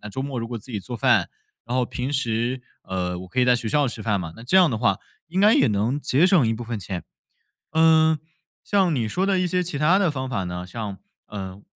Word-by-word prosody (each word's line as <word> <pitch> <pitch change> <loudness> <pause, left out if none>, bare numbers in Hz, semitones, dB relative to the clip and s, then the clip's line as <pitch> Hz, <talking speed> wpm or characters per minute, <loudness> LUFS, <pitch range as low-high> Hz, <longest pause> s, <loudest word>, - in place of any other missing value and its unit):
那 105 - -7
周 130 +6 -4
末 135 -3 -4
如 115 - -5
果 120 - -4
自 120 +3 -10
己 105 - -3
做 120 +4 -6
饭， - - +3 0.4
然 125 - -2
后 125 - +2
平 125 +3 -4
时， 125 -1 -1 0.2
呃， 90 -1 -3
我 90 0 -9
可 110 - -6
以 125 - +5
在 125 0 +5
学 115 -2 -2
校 145 +1 +2
吃 115 -2 -5
饭 105 -3 0
嘛， 80 -3 -6
那 115 - -12
这 155 +10 +2
样 180 -3 +6
的 110 - -2
话 100 -5 +2 0.3
应 180 - -3
该 210 +3 +6
也 135 - +4
能 110 +7 0
节 145 +5 +3
省 175 -10 +4
一 115 - +1
部 120 - -6
分 115 -3 -4
钱。 90 -1 -5 0.7
嗯， 160 0 +4 0.5
像 190 -5 +2
你 115 -5 0
说 180 - -1
的 195 -1 +2
一 180 - +1
些 180 +1 0
其 165 -4 -4
它 155 +6 +4
的 185 -6 +2
方 130 -2 -4
法 95 -7 -2
呢， 90 0 -5
像， 105 -2 -6 0.3
呃， 95 -1 -7
125 Hz, 270 characters per minute, -23 LUFS, 105-155 Hz, 0.7 s, 样